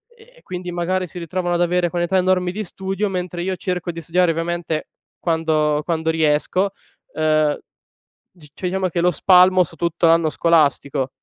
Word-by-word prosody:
e 470 +2 -20
e - - -20
quindi 180 -1 -6
magari 180 +2 -1
si 180 - -12
ritrovano 175 +1 -2
ad 175 - 0
avere 175 0 +1
quantità 175 +2 0
enormi 180 -1 +1
di 215 +4 -4
studio, 195 +2 -3
mentre 180 -2 -4
io 185 +1 -2
cerco 180 -1 -3
di 170 - -8
studiare 175 +2 +1
ovviamente 165 -1 -2 0.3
quando 155 -3 +1
quando 160 -1 -1
riesco 160 +5 +1 0.5
ehm, 155 -1 +2 0.8
c 150 - -16
cioè 180 - -4
diciamo 190 +1 -1
che 170 - -2
lo 180 +1 +3
spalmo 185 +2 +5
su 165 - -13
tutto 170 0 -1
l'anno 165 -1 +4
scolastico. 145 -5 +1
175 Hz, 170 wpm, -20 LUFS, 160-185 Hz, 0.8 s, spalmo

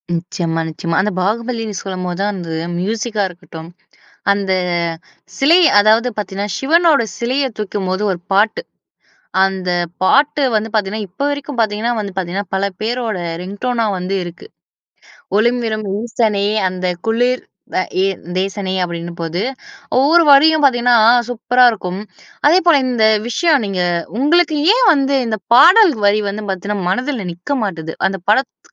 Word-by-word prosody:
நிச்சயமா, 165 -1 -3
நிச்சயமா. 165 +1 -4
அந்த 210 +2 -1
பாகுபலினு 225 +1 -2
சொல்லும்போது 185 -2 -4
தான் 205 +1 0
அந்த 175 -3 -7 0.3
மியூசிக்கா 215 +2 -2
இருக்கட்டும். 170 -2 -11 0.6
அந்த 200 -1 -1 0.9
சிலை 315 +6 +5 0.2
அதாவது 220 +4 +4
பாத்தீங்கன்னா 200 -1 -4
சிவனோட 320 -1 +3 0.2
சிலையைத் 255 0 -1
தூக்கும்போது 195 -2 -3
ஒரு 180 - -5
பாட்டு. 210 +3 +2 0.8
அந்த 190 -1 -3 0.3
பாட்டு 290 +8 +3
வந்து 215 +1 -1
பாத்தீங்கன்னா 210 0 -1
இப்ப 180 - -11
வரைக்கும் 285 -2 -5
பாத்தீங்கன்னா 220 +2 0
வந்து 200 -2 -5
பாத்தீங்கன்னா 190 +2 -3
பல 190 - -1 0.2
பேரோட 230 -2 -2 0.2
ரிங் 195 +3 -8
டோன்னா 245 -3 0
வந்து 185 +2 -3
இருக்கு. 175 0 -10 0.9
ஒழும் 240 +3 +2
விலும் 215 -1 -3 0.2
ஈசனே 220 -3 0 0.2
அந்த 185 0 -4 0.2
குளிர் 245 +3 +1 0.4
அ - - +2 0.2
எ - - +2 0.3
தேசனே 195 0 -3
அப்படின்னு 170 0 -6
போது, 165 +2 -3 0.6
ஒவ்வொரு 320 +6 +5
வரியும் 310 +2 +6
பாத்தீங்கன்னா 245 -2 +3 0.3
சூப்பரா 245 +1 +2
இருக்கும். 190 -4 -5 0.5
அதே 330 +5 +6
போல 335 -4 +6
இந்த 240 -3 +1 0.2
விஷயம் 295 +1 +2
நீங்க 190 -2 -2 0.4
உங்களுக்கு 310 +3 +2 0.2
ஏன் - - +3
வந்து 275 -2 +1
இந்த 220 -1 -2 0.2
பாடல் 360 - +7
வரி 205 +1 +3
வந்து 210 +2 -5
பாத்தீங்கன்னா 190 0 -3
மனதில 250 0 -2
நிக்க 180 +12 -4
மாட்டுது. 165 -5 -5
அந்த 195 0 -5
பட 215 - +5
த் - - -30
215 Hz, 140 wpm, -17 LUFS, 190-250 Hz, 0.9 s, பாடல்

